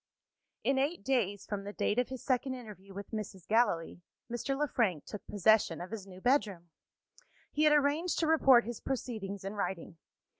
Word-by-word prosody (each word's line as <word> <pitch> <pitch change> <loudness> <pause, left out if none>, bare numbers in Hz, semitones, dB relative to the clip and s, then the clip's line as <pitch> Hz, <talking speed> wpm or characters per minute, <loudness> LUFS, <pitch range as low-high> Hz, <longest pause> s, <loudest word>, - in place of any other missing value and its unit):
In 270 -1 +2
eight 295 +6 -1
days 205 -7 0
from 205 -2 -4
the 205 +1 -6
date 210 - +1
of 250 - 0
his 260 -2 -7
second 260 0 0
interview 210 -5 -11
with 200 +1 -8
Mrs. 205 -5 -6
Gallilee, 205 -7 +1 0.3
Mr. 255 +3 -2
Le 295 +1 +1
Frank 195 - 0
took 210 - -7
possession 205 -4 +3
of 180 +3 -7
his 210 -3 -6
new 185 -1 -11
bedroom. 200 - +1 0.8
He 305 +1 +2
had 300 - +6
arranged 300 +4 +2
to 330 - +2
report 270 -6 +6
his 235 -1 -6
proceedings 215 -7 -4
in 195 - -3
writing. 190 -5 -4
220 Hz, 180 wpm, -32 LUFS, 195-265 Hz, 0.8 s, had